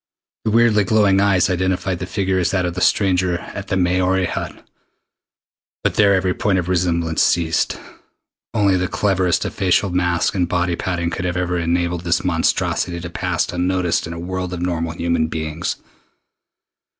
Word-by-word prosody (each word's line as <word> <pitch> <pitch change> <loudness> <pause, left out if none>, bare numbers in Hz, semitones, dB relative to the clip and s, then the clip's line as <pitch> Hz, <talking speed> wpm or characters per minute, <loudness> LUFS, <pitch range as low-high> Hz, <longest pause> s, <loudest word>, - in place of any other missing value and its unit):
The - - +2
weirdly 115 -1 +4
glowing 100 -1 +3
eyes 100 -3 +3
identified 95 0 -1
the 95 - -5
figure 95 -1 0
as 85 -2 +1
that 90 -1 0
of 85 - -2
the 90 - -5
stranger 90 -3 +2
at 100 +3 -8
the 95 - -1
Maori 90 +1 +2
Hut, - - -5 1.2
but - - +1
there 100 -2 +4
every 95 -1 +1
point 100 0 0
of 90 -2 -1
resemblance 85 -3 0
ceased. 80 -2 +1 0.7
Only 100 -4 +2
the 90 0 -1
cleverest 95 -3 +1
of - - -4
facial 95 +1 +1
masques 90 +1 0
and 90 -3 0
body 90 0 0
padding 85 -1 -2
could 90 +1 -3
ever 90 0 -2
have 90 0 -2
enabled 85 0 0
this 85 0 0
monstrosity 85 0 0
to 85 0 -7
pass 90 -1 -1
unnoticed 90 -1 0
in 85 - -6
a 85 - -7
world 90 +1 -4
of 90 - -5
normal 85 -2 -2
human 85 -1 0
beings. 80 +1 -3
90 Hz, 170 wpm, -20 LUFS, 85-95 Hz, 1.2 s, weirdly